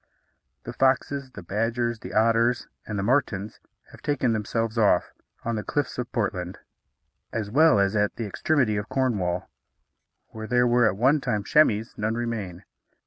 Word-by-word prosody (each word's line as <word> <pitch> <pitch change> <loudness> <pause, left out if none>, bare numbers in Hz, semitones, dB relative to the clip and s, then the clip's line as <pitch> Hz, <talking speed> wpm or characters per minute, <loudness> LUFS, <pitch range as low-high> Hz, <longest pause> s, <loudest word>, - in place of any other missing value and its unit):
The - - -7
foxes, 135 +1 +1
the 100 -6 -11
badgers, 115 +4 -1
the - - -8
otters, 115 +2 +2 0.2
and 105 - -3
the 95 - -1
martens 105 -4 0 0.3
have - - -15
taken 130 -5 0
themselves 115 +1 -2
off; 110 -3 +2 0.3
on 115 0 -1
the 105 - -3
cliffs 145 0 -2
of 125 0 -4
Portland, 95 -6 -2 0.7
as 105 -2 -3
well 145 -5 +5
as 100 +1 +2
at 105 -1 +1
the 115 - -4
extremity 110 +1 +1
of 105 +2 -4
Cornwall, 95 -9 -1 0.8
where 110 0 -8
there 125 +1 +3
were 120 -1 +4
at 100 - -1
one 135 +6 +3
time 105 -5 -1
chamois, 110 -4 +3
none 110 +1 -1
remain. 105 -6 -4
115 Hz, 160 wpm, -25 LUFS, 105-125 Hz, 0.8 s, well